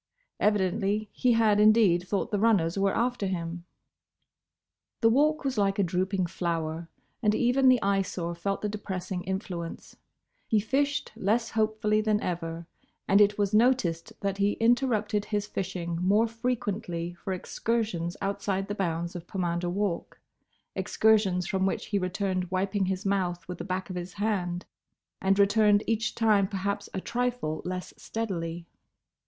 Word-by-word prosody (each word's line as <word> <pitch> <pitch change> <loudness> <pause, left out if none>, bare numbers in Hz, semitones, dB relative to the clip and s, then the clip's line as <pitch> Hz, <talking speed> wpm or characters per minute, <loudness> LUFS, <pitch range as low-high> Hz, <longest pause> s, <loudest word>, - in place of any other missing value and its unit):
Evidently 205 +1 +1
he 250 -1 +2
had 220 -2 +4
indeed 210 -5 +5
thought 200 - -1
the 205 - +1
runners 195 -7 +3
were 195 0 +1
after 240 -4 0
him. 170 -2 -4 1.4
The 225 - +6
Walk 305 +5 +3
was 265 -5 0
like 195 -1 +2
a 200 - +3
drooping 185 +2 0
flower, 165 -1 -3 0.3
and 210 -2 +3
even 255 +2 +4
the 255 -1 +5
Eyesore 190 -3 0
felt 195 +5 -3
the - - +1
depressing 190 -3 -4
influence; 185 -3 -5 0.5
he 220 - +3
fished 280 +7 0
less 225 +4 0
hopefully 215 -1 +1
than 215 -1 +2
ever, 165 -3 -4 0.4
and 200 +2 +5
it 205 0 +4
was 205 0 0
noticed 215 -8 +2
that 195 0 -2
he 200 +1 +3
interrupted 225 -3 +1
his 205 -1 -1
fishing 180 -4 -3
more 205 +5 +3
frequently 210 -7 -3
for 185 +3 -6
excursions 185 -2 -2
outside 195 -1 -1
the - - -1
bounds 170 -3 -2
of 175 -1 -7
Pomander 175 -2 -1
Walk: 195 -1 -2 0.6
excursions 205 -5 +2
from 190 0 0
which - - -2
he 205 - 0
returned 185 -1 -1
wiping 190 +1 0
his 190 +1 -2
mouth 185 -3 -1
with 180 -1 -6
the - - -4
back 185 +1 -3
of - - -5
his 180 +1 -5
hand, 185 -4 -1 0.6
and 195 +1 +3
returned 205 +1 +4
each 225 +1 -1
time 210 -4 +3
perhaps 200 +1 -3
a - - -3
trifle 245 -10 -2
less 180 0 -4
steadily. 175 -7 -4
200 Hz, 150 wpm, -28 LUFS, 180-215 Hz, 1.4 s, The